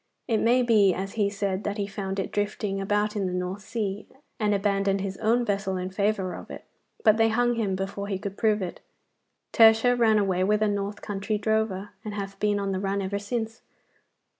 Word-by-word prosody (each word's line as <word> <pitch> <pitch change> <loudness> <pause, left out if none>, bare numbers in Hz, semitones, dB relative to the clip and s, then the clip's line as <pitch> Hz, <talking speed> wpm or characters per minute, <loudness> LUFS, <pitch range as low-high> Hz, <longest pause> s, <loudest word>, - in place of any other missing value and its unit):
It 225 -3 +2
may 245 +2 +3
be, 210 -6 +4
as 195 +1 -4
he 205 -3 +1
said, 200 -1 -2
that 205 +1 -3
he 200 - -1
found 195 -1 -4
it 195 - -2
drifting 205 -1 -2
about 205 +2 0
in 200 -2 0
the 180 - -3
North 180 +2 -3
Sea, 205 -1 -4 0.3
and 210 -2 +1
abandoned 200 -1 +1
his 195 -1 -3
own 235 +2 +2
vessel 195 -2 -1
in 185 +1 -4
favour 200 -1 0
of - - -9
it, - - -9 0.4
but 215 0 +5
they 225 0 +4
hung 240 +2 +2
him 210 -5 -1
before 195 +1 -4
he 195 -2 -2
could 200 0 -6
prove 210 -2 +1
it. 175 - -6 0.7
Tertia 225 +2 +6
ran 225 -3 +4
away 190 -3 +1
with 210 +2 +2
a - - +3
north 205 0 -3
country 205 +1 -2
drover, 210 -2 -1
and 210 -2 -5
hath 195 -1 -5
been 205 -1 +1
on 200 -1 -2
the 190 - -1
run 195 +1 -1
ever 200 +1 -2
since. 225 +1 -4
205 Hz, 210 wpm, -26 LUFS, 195-215 Hz, 0.7 s, Tertia